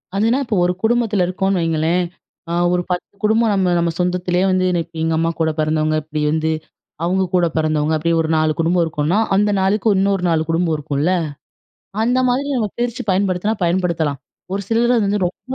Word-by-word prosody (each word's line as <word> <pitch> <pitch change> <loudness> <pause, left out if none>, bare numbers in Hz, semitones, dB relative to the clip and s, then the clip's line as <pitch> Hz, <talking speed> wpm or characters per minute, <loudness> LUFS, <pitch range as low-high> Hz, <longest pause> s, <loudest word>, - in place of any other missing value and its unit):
அதுனா, 225 +6 +2
இப்போ 220 -3 -1
ஒரு 180 - +1
குடும்பத்துல 225 -4 +2
இருக்கோம்னு 190 +1 0
வைங்களேன். 165 +2 +1 0.5
அ - - -3 0.2
ஒரு 180 - +1
10 180 - -1 0.2
குடும்பம் 220 +1 +3
நம்ம 185 -2 +1
நம்ம 170 -1 +1
சொந்தத்திலேயே 180 0 0
வந்து 185 0 +2
இன்னைக்கு 170 -1 -2
எங்க 160 - +1
அம்மா 165 +1 +1
கூட 160 -1 +2
பிறந்தவங்க. 155 0 +1
இப்டி 155 0 -4
வந்து 160 0 0 0.5
அவுங்க 190 +2 +1
கூட 175 -1 +3
பிறந்தவங்க. 155 0 +1
அப்டி 170 +2 -1
ஒரு 160 - -2
4 155 0 +2
குடும்பம் 170 +1 +2
இருக்குனா. 160 +5 0 0.2
அந்த 205 +1 +3
4க்கு 205 +2 +2
இன்னொரு 195 -1 +1
4 160 -1 +2
குடும்பம் 165 -1 +1
இருக்கும்ல. 150 +3 -1 0.9
அந்த 245 +3 +2
மாரி 260 +3 0
நம்ம 215 -3 0
பிரிச்சு 240 -1 -2
பயன்படுத்தினா 190 +2 0
பயன்படுத்தலாம். 170 -5 0 0.3
ஒரு 200 +1 -2
சிலர் 235 +2 +2
அது 220 - +2
வந்து 200 -2 0
ரொம்ப 255 +8 -7
180 Hz, 180 wpm, -19 LUFS, 160-205 Hz, 0.9 s, குடும்பம்